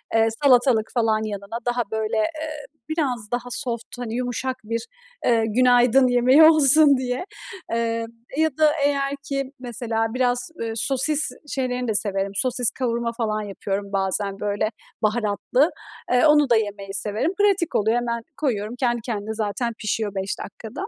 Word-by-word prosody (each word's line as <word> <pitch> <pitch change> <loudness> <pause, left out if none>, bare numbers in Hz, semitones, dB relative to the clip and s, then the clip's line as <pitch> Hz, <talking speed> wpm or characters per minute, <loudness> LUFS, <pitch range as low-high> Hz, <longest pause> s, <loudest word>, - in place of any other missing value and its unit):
Eee, 225 0 +4 0.2
salatalık 245 -4 +4
falan 220 -3 +1
yanına, 205 +1 -5
daha 245 0 0
böyle, 220 0 -1
eee, 305 +5 -3 0.2
biraz 255 -9 -2
daha 245 0 -3
soft, 235 -1 -3
hani, 235 -2 -4
yumuşak 250 +1 -2
bir, 230 - -4 0.4
eee, 230 -2 +3
günaydın 250 +2 +4
yemeği 250 +5 +5
olsun 305 -2 +6
diye, 255 +4 -3 0.5
eee, 230 0 -1 0.3
ya 315 0 +3
da 310 -1 +5
eğer 275 -1 +1
ki 275 -1 -3
mesela 230 -2 -2
biraz, 245 -1 0
ııı, 225 -1 -2
sosis 275 +6 0 0.2
şeylerini 250 -2 -2
de 220 - 0
severim. 195 -1 0
Sosis 245 +1 +2
kavurma 235 -2 -2
falan 215 -3 -1
yapıyorum 200 0 -4
bazen, 195 +1 -1
böyle, 210 +1 -1 0.3
baharatlı, 220 +6 +1 0.4
eee, 250 +4 +4
onu 295 -2 +5
da 235 - +5
yemeyi 205 -2 -2
severim, 210 - -1
pratik 400 -5 +2
oluyor, 220 +3 +2
hemen 235 -1 -2 0.2
koyuyorum, 230 -6 -2
kendi 240 -2 0
kendine 220 -2 -4
zaten 220 +2 -2
pişiyor 215 -1 -2
5 190 0 -3
dakikada. 215 +2 -7
240 Hz, 150 wpm, -23 LUFS, 215-260 Hz, 0.5 s, olsun